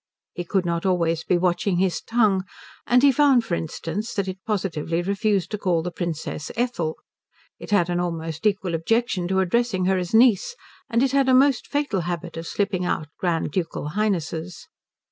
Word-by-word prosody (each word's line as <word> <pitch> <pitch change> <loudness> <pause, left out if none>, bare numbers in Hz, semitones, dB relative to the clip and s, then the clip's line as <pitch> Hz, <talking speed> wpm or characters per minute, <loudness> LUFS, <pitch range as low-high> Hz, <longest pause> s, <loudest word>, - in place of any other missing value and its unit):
He 175 - -4
could 185 +1 0
not 170 -1 -1
always 170 -4 +1
be 180 - +2
watching 180 +1 +1
his 185 -1 +1
tongue, 215 -5 +2 0.4
and 250 +2 +4
he 285 - +7
found 270 -4 +4
for 185 - -4
instance 170 +6 -4
that 200 -3 -1
it 185 0 -6
positively 175 -5 -1
refused 200 0 0
to 210 - -3
call 175 -5 +1
the 175 - -3
Princess 160 -3 -4
Ethel. 225 -10 -1 0.6
It - - -9
had 205 -5 +3
an 175 0 -1
almost 165 +1 -2
equal 195 -4 -1
objection 185 +2 0
to 190 +1 +2
addressing 190 0 +1
her 190 0 +2
as 180 -1 -4
niece; 230 - +4 0.3
and 230 +2 +2
it 270 - +2
had 275 -1 +3
a 255 - +6
most 270 -1 +3
fatal 285 -10 -1
habit 175 0 -4
of 165 0 -6
slipping 200 -3 -1
out 155 -3 -2
Grand 170 -4 0
Ducal 165 -3 -3
Highnesses. 170 -4 -2
185 Hz, 185 wpm, -23 LUFS, 170-215 Hz, 0.6 s, he